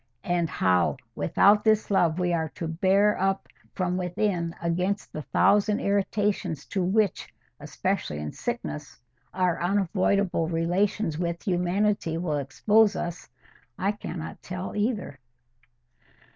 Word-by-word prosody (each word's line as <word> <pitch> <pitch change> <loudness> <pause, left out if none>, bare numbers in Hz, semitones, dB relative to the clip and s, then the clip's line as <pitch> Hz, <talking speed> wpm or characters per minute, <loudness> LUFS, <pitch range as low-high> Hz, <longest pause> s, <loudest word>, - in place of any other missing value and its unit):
And 175 -2 0
how 90 -8 +2 0.2
without 200 - +4
this 215 -1 +2
love 170 -4 +3
we 180 -1 +1
are 160 -2 0
to 165 - -4
bear 190 +5 +2
up 195 0 0 0.3
from 180 -1 -1
within 180 -2 -1
against 180 +4 -1
the 155 - -4
thousand 205 +6 +3
irritations 200 -5 0
to 190 - 0
which, 200 +1 +1 0.3
especially 75 - -2
in 75 0 -4
sickness, 235 -11 -5 0.3
our 180 -3 0
unavoidable 190 -1 +1
relations 170 +1 0
with 170 -1 -2
humanity 180 -1 +1
will 165 -3 -1
expose 205 +9 +3
us, 170 -5 -5 0.5
I 195 +2 +1
cannot 175 -5 -7
tell 180 +1 -6
either." 205 - -2
180 Hz, 120 wpm, -26 LUFS, 165-200 Hz, 0.5 s, without